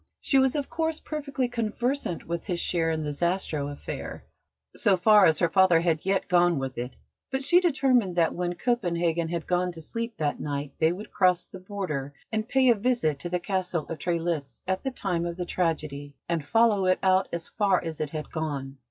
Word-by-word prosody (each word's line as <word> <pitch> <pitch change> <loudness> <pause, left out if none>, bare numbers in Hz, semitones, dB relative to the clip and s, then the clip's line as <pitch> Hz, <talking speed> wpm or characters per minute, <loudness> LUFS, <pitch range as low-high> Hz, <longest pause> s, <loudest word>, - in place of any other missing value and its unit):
She 270 - +3
was, 265 +1 +3
of 285 -2 -1
course, 320 -1 -1
perfectly 280 -4 -3
conversant 240 - -2
with 170 +2 -4
his 175 -3 -1
share 165 -2 +1
in 160 -1 -1
the 150 - -2
Zastrow 165 -2 -1
affair, 145 - -7 0.5
so 200 -4 +3
far 210 +1 +6
as 160 -2 +3
her 170 - +3
father 185 -1 +5
had 165 -2 0
yet 195 0 +1
gone 175 -2 +4
with 135 -2 -4
it; 125 +1 -5 0.3
but 265 +1 -2
she 350 +6 +5
determined 265 - +2
that 170 -2 +2
when 175 0 -2
Copenhagen 175 -7 0
had 170 -1 -3
gone 180 0 0
to 165 - -10
sleep 230 +8 -5
that 150 -2 -1
night 140 -1 -4
they 160 0 +4
would 195 +5 -7
cross 180 -2 +3
the 190 - -11
Border 180 -8 -4 0.2
and 220 +1 -2
pay 265 -1 +4
a - - +8
visit 210 - 0
to 175 - -4
the 180 +1 0
Castle 180 -4 -2
of 165 - -5
Trelitz 165 -5 -2
at 190 0 0
the 265 - 0
time 185 -9 -2
of 170 0 -4
the 180 - -3
tragedy, 155 -5 -2
and 170 -3 -1
follow 215 +1 +3
it 185 - +4
out 190 0 +4
as 170 -1 -4
far 200 -4 +2
as 160 -2 -5
it 150 - -2
had 155 0 -6
gone. 140 -4 -4
180 Hz, 205 wpm, -27 LUFS, 160-215 Hz, 0.5 s, a